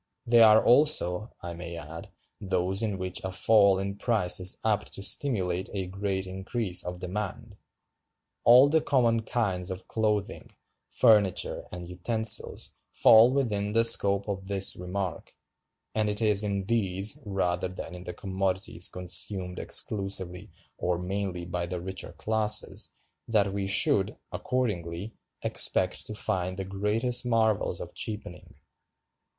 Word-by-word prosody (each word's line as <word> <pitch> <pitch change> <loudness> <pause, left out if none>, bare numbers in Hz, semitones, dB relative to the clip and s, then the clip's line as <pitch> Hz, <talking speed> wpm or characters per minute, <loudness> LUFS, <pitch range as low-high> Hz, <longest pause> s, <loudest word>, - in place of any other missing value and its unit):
They 120 0 +4
are 110 -1 +6
also, 120 - +4
I 85 0 -6
may 85 0 -6
add, 80 +1 -9 0.3
those 95 0 -1
in 105 -4 -2
which 95 -1 -3
a 95 - -4
fall 100 +1 +3
in 100 +1 -4
price 105 -7 +2
is 90 0 +3
apt 105 -1 -1
to 100 - -5
stimulate 95 -6 +1
a 95 -2 -3
great 95 +1 -4
increase 95 0 -3
of 90 0 -6
demand. 105 +3 -6 0.9
All 125 +4 +7
the 160 +2 +2
common 120 -5 +1
kinds 100 -6 -2
of 95 0 -7
clothing, 105 -3 -2 0.4
furniture, 105 -6 +2
and 90 -1 -8
utensils 110 +5 +1 0.2
fall 115 +2 +6
within 105 -7 -1
the 115 +1 +3
scope 100 -3 +4
of 95 -2 -5
this 100 -1 +1
remark; 90 -1 -6 0.6
and 110 -1 0
it 105 0 0
is 105 -2 +4
in 100 -2 -2
these, 100 +3 -1
rather 95 -4 -2
than 90 -2 -8
in 90 0 -10
the 90 - -6
commodities 95 -2 -2
consumed 90 +1 -1
exclusively 95 -2 -1 0.3
or 90 -1 -1
mainly 90 -1 -4
by 85 0 -4
the 90 0 -5
richer 95 +2 -5
classes, 110 -1 0 0.4
that 100 -4 +1
we 100 -1 -3
should, 100 -1 +3
accordingly, 105 -5 -3 0.3
expect - - +2
to 110 - -7
find 95 -2 -2
the 95 - -4
greatest 105 +6 0
marvels 110 -3 0
of - - -8
cheapening." 105 -5 -5
100 Hz, 140 wpm, -27 LUFS, 90-110 Hz, 0.9 s, All